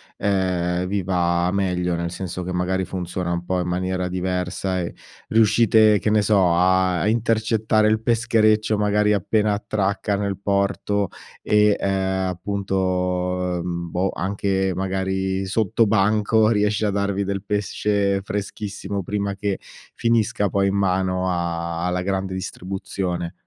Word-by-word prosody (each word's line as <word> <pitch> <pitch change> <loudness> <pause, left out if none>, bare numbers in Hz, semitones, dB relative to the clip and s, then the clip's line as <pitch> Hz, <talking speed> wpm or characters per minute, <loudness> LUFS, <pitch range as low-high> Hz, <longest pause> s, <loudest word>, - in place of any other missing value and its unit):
ehm, 90 -3 0
vi 100 0 -1
va 85 -1 +1
meglio? 90 -2 0
Nel 85 0 -2
senso 90 0 -5
che 90 +1 -4
magari 90 +1 0
funziona 90 -1 -3
un 85 0 -3
po' 90 +1 -1
in 90 - -2
maniera 90 +1 -1
diversa, 90 +1 -2
e 85 -1 -4 0.3
riuscite, 110 -1 +4
che - - 0
ne 105 0 +3
so, 95 -4 +3
a 90 0 +2
a - - +1
intercettare 110 -1 +2
il 110 0 +2
peschereccio 110 -2 +2
magari 105 0 +2
appena 105 +1 +1
attracca 100 0 -1
nel 100 -1 -2
porto, 100 0 0 0.3
e, 105 -1 +3
ehm, 95 -1 0
appunto, 95 +2 -3 0.8
uhm, 85 0 -4
boh, 90 +3 0
anche 95 0 -1
magari 95 +1 -1
sottobanco 110 +1 +2
riesce 105 -1 +1
a 105 - +1
darvi 100 0 -1
del 100 0 -3
pesce 100 -1 0
freschissimo 100 0 -4
prima 100 +1 -2
che 100 0 -2 0.4
finisca 115 -2 +1
poi 100 +1 +1
in 95 - -1
mano 95 -1 +1
a 85 -1 -2
alla 90 0 -1
grande 95 0 -2
distribuzione. 95 -1 -4
95 Hz, 135 wpm, -22 LUFS, 90-105 Hz, 0.8 s, riuscite